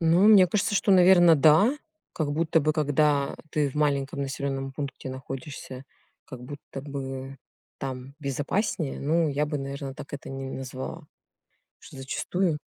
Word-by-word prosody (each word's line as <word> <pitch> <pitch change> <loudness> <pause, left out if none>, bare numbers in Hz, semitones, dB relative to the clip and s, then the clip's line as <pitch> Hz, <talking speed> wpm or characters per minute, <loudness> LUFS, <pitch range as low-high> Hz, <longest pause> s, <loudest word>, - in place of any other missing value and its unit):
Ну, 170 +4 +4
мне 195 -4 +8
кажется, 205 +3 0
что, 200 - +2
наверно, 175 -2 +7
да. 160 - +5 0.4
Как 145 -3 -2
будто 160 +1 +2
бы 155 +2 +1
когда 145 -2 +1
ты 150 -2 +1
в - - -15
маленьком 140 -2 0
населенном 135 -1 -3
пункте 135 -2 -6
находишься, 130 0 -7 0.4
как 130 -3 -10
будто 140 0 -8
бы 135 -1 -6 0.4
там 135 0 -6
безопаснее. 145 - -2
Ну, 160 +2 +2
я 145 +1 0
бы, 150 0 -2
наверно, 135 0 -5
так 145 - -10
это 145 - -7
не 135 0 -5
назвала. 135 +5 -6 0.7
Что - - -14
зачастую 160 +4 -1
145 Hz, 145 wpm, -26 LUFS, 135-160 Hz, 0.7 s, мне